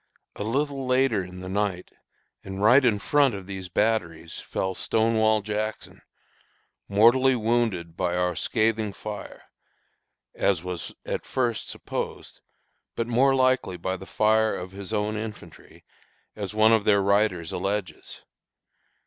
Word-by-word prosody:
A - - -4
little 135 +3 -1
later 130 -6 +2
in 90 0 -10
the 95 - -7
night, 95 -2 -2 0.5
and 95 0 -7
right 125 +7 +6
in 115 -4 +3
front 140 +3 +2
of 95 -2 -8
these 95 -1 -7
batteries, 85 -5 -1
fell 95 0 -3
Stonewall 110 +1 +2
Jackson, 110 +1 -4 0.9
mortally 120 +6 +5
wounded 110 -8 0
by 90 0 -1
our 90 -1 0
scathing 110 +1 0
fire, 105 +1 -8 0.9
as 90 -4 +1
was 90 -4 -5
at - - -3
first 120 -3 -1
supposed, - - -6 0.5
but 115 - -1
more 130 +3 +3
likely 130 -8 +2
by 95 +2 -2
the 95 +1 -10
fire 110 0 +2
of 90 +1 -6
his 100 +1 -8
own 105 0 -1
infantry, 110 0 -9 0.5
as 105 -1 -5
one 110 +1 +5
of 110 -2 +3
their 100 -1 +3
writers 100 -4 +1
alleges. 100 -5 -4
105 Hz, 135 wpm, -25 LUFS, 95-115 Hz, 0.9 s, right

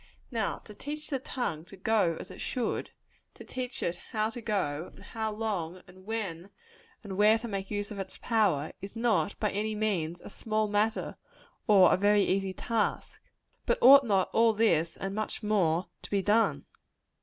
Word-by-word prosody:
Now, 225 -4 -1
to 210 - -11
teach 300 +8 -7
the 270 - 0
tongue 245 -12 -3
to 190 +2 -13
go 190 -5 +2
as 185 - -9
it - - -10
should 245 -2 -2 0.5
to - - -11
teach 255 -1 -5
it 170 +1 -1 0.2
how 215 0 0
to 240 - -7
go, 185 -8 -2
and - - -14
how 220 -1 -3
long, 190 -5 -3
and 185 +2 -17
when 195 -5 -4 0.5
and 195 -3 -6
where 215 +2 +6
to 230 +1 -6
make 195 -3 -4
use 205 0 -3
of 205 - -6
its 190 -1 -6
power 200 - +1
is 195 +3 -8
not, 215 -7 +1
by 210 - 0
any 215 +2 -2
means, 180 -6 -1
a - - -10
small 215 -1 -1
matter, 210 +2 0 0.5
or 195 -4 +7
a - - +3
very 205 +1 +4
easy 195 0 0
task. 220 +3 -2 0.5
But - - +3
ought 275 +3 +9
not 195 -6 +1
all 225 0 +5
this, 170 -7 +2
and 195 0 -4
much 215 +1 -3
more, 185 -5 +2 0.2
to - - -10
be 200 -1 0
done? 220 +3 +2
210 Hz, 185 wpm, -29 LUFS, 185-225 Hz, 0.5 s, ought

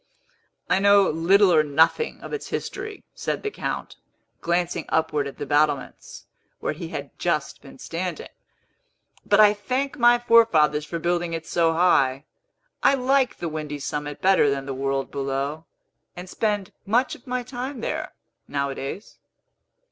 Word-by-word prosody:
"I 185 - +2
know 200 -1 +5
little 180 +4 +4
or 155 - +6
nothing 160 - +1
of - - -8
its 440 - -4
history," 410 +1 -5
said - - -3
the 425 - -2
Count, - - -5 0.4
glancing 175 0 -1
upward 155 -3 0
at 140 - -9
the 145 - -4
battlements, 145 -1 -1 0.3
where - - -2
he - - -7
had - - -6
just - - -1
been - - -14
standing. 175 +2 -5 1.0
"But 205 - +4
I 210 -1 +7
thank 255 +8 -3
my 240 0 +6
forefathers 165 - +4
for 170 - -3
building 170 0 -1
it 165 0 -4
so 165 -1 +1
high. 140 -5 +2 0.6
I 275 - +5
like 265 0 +1
the 170 - -4
windy 155 -2 -5
summit 145 0 -5
better 190 -6 +5
than 135 -1 -2
the 135 - -4
world 135 0 -2
below, 140 +3 -3 0.5
and 180 +1 -8
spend 205 -1 -2 0.2
much 240 +5 +2
of 245 - -13
my 250 0 -2
time 250 +1 -6
there, - - -4 0.3
nowadays." 140 +6 -4
170 Hz, 150 wpm, -24 LUFS, 145-220 Hz, 1.0 s, I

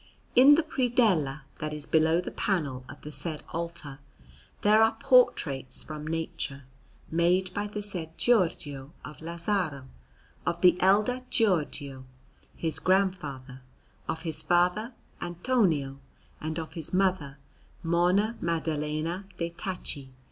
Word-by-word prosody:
In 275 +4 +9
the 325 - +2
predella 225 - +1 0.2
that 155 0 -3
is 150 -1 -6
below 160 +1 +3
the - - -6
panel 145 -10 -1
of 140 - -11
the 150 - -7
said 155 0 -4
altar 165 -4 -5 0.6
there 215 +1 +6
are 225 0 +3
portraits 140 - +3
from 155 0 -7
nature, 160 -4 -3 0.5
made 180 +3 +2
by 205 +2 -2
the 210 0 -5
said 170 -6 -4
Giorgio, 155 - +1
of 150 +4 -10
Lazzaro, 170 -4 -2 0.6
of 170 - -1
the 180 -2 +7
elder 210 +7 +3
Giorgio, 150 - 0 0.5
his 160 -2 -1
grandfather, 150 -9 0 0.5
of 160 0 -3
his 160 -3 -3
father 180 +7 +2 0.3
Antonio, 175 - 0 0.4
and 155 +1 -3
of 160 -1 -5
his 165 -1 -6
mother 180 -7 +1 0.5
Monna 180 +7 +2
Maddalena 160 +2 -2
de' 170 0 -2
Tacci. 170 -7 -5
170 Hz, 125 wpm, -28 LUFS, 150-195 Hz, 0.6 s, In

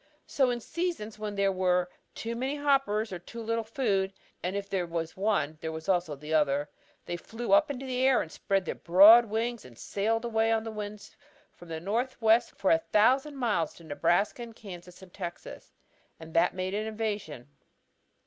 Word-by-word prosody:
So 265 -3 +2
in 240 -1 -1
seasons 305 -10 -4
when 210 -1 -4
there 200 0 +2
were 180 -1 +1 0.3
too 230 +1 -4
many 260 +4 -2
hoppers 270 -8 +1
or 180 - -5
too 230 +7 -10
little 230 +1 -1
food 205 -5 0 0.3
and 180 +2 -3
if 200 0 -3
there 190 -3 -2
was 165 -1 -4
one, 185 -7 0
there 160 - -3
was 160 0 -7
also 175 -5 +1
the 150 +3 -6
other 145 -1 +2 0.4
they 175 - -3
flew 230 +6 -6
up 305 0 +5
into 270 -1 -5
the 255 -1 -2
air, 260 -9 +3
spread 190 +5 -1
their - - -2
broad 205 +7 +8
wings 230 +2 -2
and 120 -2 -14
sailed 225 - -1
away 225 -1 +1
on 225 -1 +1
the 225 - -5
winds 210 -1 -7 0.4
from 175 - -15
the 160 -1 -5
northwest 230 +4 +1
for 195 - +1
a 165 - +5
thousand 260 - +2
miles 210 - 0
to 170 - -15
Nebraska 170 +9 +1
and 230 -1 -8
Kansas 180 -3 -11
and 180 - -15
Texas. 175 -3 -8 0.5
And 160 0 -11
that 175 +2 +3
made 185 +1 -3
an 215 +2 -2
invasion." 205 - -4
205 Hz, 185 wpm, -29 LUFS, 175-230 Hz, 0.5 s, broad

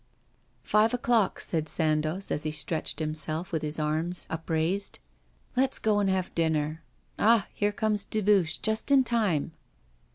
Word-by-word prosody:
'Five 220 +3 +3
o'clock,' 235 -4 +1
said 160 -2 -2
Sandoz, 155 +4 0
as - - -1
he 155 - -2
stretched 150 +1 -3
himself, 155 +2 -1
with 160 -3 -1
his 150 0 -1
arms 160 +3 -1
upraised. 165 +4 -2 0.6
'Let's 265 +1 +3
go 215 -1 +1
and 200 -1 +1
have 190 -1 -1
dinner. 160 -1 0 0.4
Ah! 220 -1 +4
here 205 0 0
comes 210 -1 -1
Dubuche, 205 -5 +1
just 220 +3 0
in 275 -1 +6
time. 210 - 0
175 Hz, 140 wpm, -28 LUFS, 155-210 Hz, 0.6 s, in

